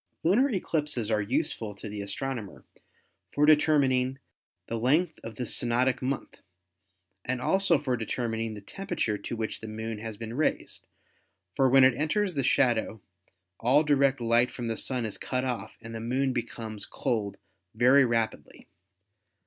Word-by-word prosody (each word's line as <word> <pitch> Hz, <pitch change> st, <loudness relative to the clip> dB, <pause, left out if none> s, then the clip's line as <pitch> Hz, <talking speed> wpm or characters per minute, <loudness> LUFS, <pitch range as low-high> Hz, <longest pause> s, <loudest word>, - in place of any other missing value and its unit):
Lunar 225 Hz, +12 st, +4 dB
eclipses 150 Hz, -, -1 dB
are 105 Hz, -1 st, +2 dB
useful 115 Hz, -2 st, -2 dB
to 105 Hz, -, -8 dB
the 105 Hz, 0 st, -5 dB
astronomer 110 Hz, +1 st, -5 dB, 0.7 s
for 145 Hz, -, +3 dB
determining 135 Hz, -4 st, +3 dB, 0.5 s
the 115 Hz, -, -4 dB
length 155 Hz, +8 st, +2 dB
of 115 Hz, -1 st, -7 dB
the 125 Hz, -, -3 dB
synodic 125 Hz, +3 st, +1 dB
month 130 Hz, +1 st, -3 dB, 0.8 s
and 130 Hz, 0 st, -2 dB
also 190 Hz, +4 st, +3 dB
for 135 Hz, -3 st, -1 dB
determining 115 Hz, -1 st, -3 dB
the 105 Hz, -, -9 dB
temperature 155 Hz, -, -3 dB
to -, -, -5 dB
which 110 Hz, -1 st, -4 dB
the 110 Hz, -, -7 dB
Moon 110 Hz, 0 st, -5 dB
has 110 Hz, -1 st, -6 dB
been 115 Hz, 0 st, -6 dB
raised, 150 Hz, +5 st, -2 dB, 0.7 s
for 135 Hz, -1 st, +4 dB
when 135 Hz, +1 st, +7 dB
it 130 Hz, 0 st, +6 dB
enters 175 Hz, -, 0 dB
the 140 Hz, -3 st, -1 dB
shadow 120 Hz, -3 st, +2 dB, 0.6 s
all 135 Hz, +6 st, +4 dB
direct 140 Hz, -3 st, +3 dB
light 120 Hz, +1 st, +3 dB
from 120 Hz, -2 st, -5 dB
the 115 Hz, -, -1 dB
Sun 125 Hz, 0 st, -2 dB
is 110 Hz, -, -5 dB
cut 130 Hz, 0 st, -2 dB
off 115 Hz, -4 st, -4 dB
and 115 Hz, 0 st, -9 dB
the 115 Hz, -, -5 dB
Moon 130 Hz, +4 st, 0 dB
becomes 110 Hz, -3 st, -5 dB
cold 105 Hz, -4 st, -2 dB, 0.4 s
very 130 Hz, +4 st, +6 dB
rapidly. 115 Hz, -2 st, -2 dB
125 Hz, 155 wpm, -28 LUFS, 110-140 Hz, 0.8 s, when